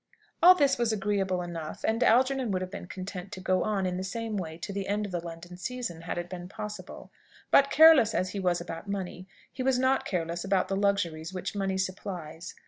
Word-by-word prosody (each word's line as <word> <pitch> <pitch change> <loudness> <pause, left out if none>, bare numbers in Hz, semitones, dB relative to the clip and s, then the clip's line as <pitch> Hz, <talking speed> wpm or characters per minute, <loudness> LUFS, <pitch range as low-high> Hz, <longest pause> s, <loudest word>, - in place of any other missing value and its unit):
All 360 +2 +9
this 280 -6 +2
was 235 -2 +2
agreeable 195 -3 0
enough, 165 -3 -6
and 225 +2 +1
Algernon 260 +1 +3
would 185 -2 0
have 185 - -7
been 175 - -7
content 185 0 -7
to 190 - -6
go 185 0 +1
on 205 -3 0
in 180 -1 -1
the 185 - -3
same 225 +3 -4
way 160 -5 -4
to 185 +4 -6
the 195 -1 -3
end 210 +1 0
of 200 - -7
the 175 -1 -3
London 170 +1 -9
season 235 -5 -4
had 165 - -4
it 175 0 -3
been 180 0 -7
possible. 210 +1 -8 0.4
But 275 0 +6
careless 310 -8 +7
as 185 0 0
he 200 - -4
was 180 -2 +1
about 170 +2 -7
money, 185 -2 -4 0.3
he 260 - -5
was 260 0 +2
not 260 +1 +2
careless 170 -1 -2
about 195 -1 +1
the 195 - 0
luxuries 190 -4 0
which 185 - -4
money 195 -1 -1
supplies. 180 -3 -5
190 Hz, 220 wpm, -28 LUFS, 175-215 Hz, 0.4 s, All